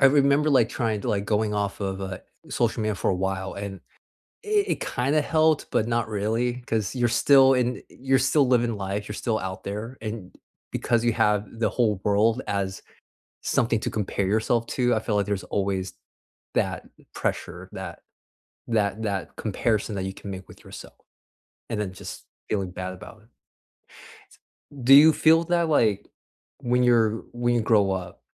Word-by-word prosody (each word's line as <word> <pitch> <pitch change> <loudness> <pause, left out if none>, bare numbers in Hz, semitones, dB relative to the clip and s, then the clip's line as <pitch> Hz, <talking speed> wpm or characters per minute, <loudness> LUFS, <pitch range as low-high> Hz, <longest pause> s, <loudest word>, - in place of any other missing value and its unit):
I 135 - +8
remember, 140 +2 +4
like, 125 -5 +4
trying 115 -4 -1
to, - - -3
like, 100 -1 0
going 105 0 0
off 100 -1 -2
of, 95 -1 -3
uh, 95 -1 -5 0.3
social 115 -2 0
media 110 0 0
for - - 0
a - - +1
while 95 +1 -2
and 100 -1 -6 0.7
it 420 -1 +2
it - - -9
kinda 140 +5 0
helped 155 0 +2
but 110 - +1
not 120 -1 0
really 115 +4 -1
'cause 110 -1 -1
you're 120 -2 +2
still 135 +2 +6
in 125 0 0
you're 135 0 +1
still 135 +1 +3
living 120 -2 +2
life, 100 +1 -3
you're 105 - -5
still 110 -2 0
out 95 0 -6
there. 110 +6 -5
And 105 -4 -6 0.4
because 120 -1 0
you 120 - +3
have 105 -2 +2
the 115 - +2
whole 110 -6 +1
world 110 +4 +2
as 100 -2 -2 0.6
something 115 -2 +1
to - - -2
compare 100 -2 -2
yourself 115 +2 +1
to, 125 -1 +1
I 110 - 0
feel 105 -1 -1
like 100 -1 +1
there's 100 -2 -2
always 95 -1 -2 0.6
that - - -1 0.3
pressure, - - -3
that - - -7 0.7
that 110 -1 0
that 100 -3 -3
comparison 110 0 -1
that 95 - -2
you 95 0 -4
can 100 - -9
make 95 0 -8
with - - -15
yourself - - -11 0.8
and 110 - -2
then 95 -3 -4
just - - -9 0.2
feeling 95 -4 -1
bad 95 0 -5
about 105 +4 -12
it. 115 - -26 1.5
Do 135 +3 +7
you 155 +3 +9
feel 160 +2 +4
that, 170 -1 +1
like, 110 -9 +2 0.5
when 125 +1 +1
you're 115 -2 +3
when 120 0 0
you 120 - +2
grow 105 -3 +3
up, 90 -1 -6
110 Hz, 175 wpm, -25 LUFS, 100-125 Hz, 1.5 s, you